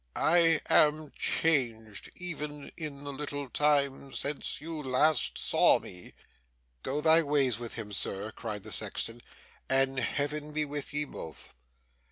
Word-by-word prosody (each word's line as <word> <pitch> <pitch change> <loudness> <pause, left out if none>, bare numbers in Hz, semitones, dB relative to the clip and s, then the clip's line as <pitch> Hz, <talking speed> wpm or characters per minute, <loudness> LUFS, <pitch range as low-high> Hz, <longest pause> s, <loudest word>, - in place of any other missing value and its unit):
I 165 -1 +4
am 150 0 +4
changed, 115 -10 -1
even 150 -5 -7
in 150 -4 -7
the 145 0 -6
little 145 0 -5
time 140 -1 +1
since 145 0 0
you 160 +1 -6
last 145 +3 +2
saw - - +5
me.' 90 -1 -10 0.7
'Go 145 +3 -3
thy 160 +1 +5
ways 140 -6 +1
with 120 -1 -6
him, 105 -3 -6
Sir,' 100 +2 -4
cried 110 -3 -6
the - - -7
sexton, 115 +1 0 0.5
'and 135 0 +2
Heaven 150 +3 -2
be 155 0 0
with 145 0 -4
ye 150 +1 +3
both! 80 - -10
145 Hz, 140 wpm, -29 LUFS, 125-150 Hz, 0.7 s, saw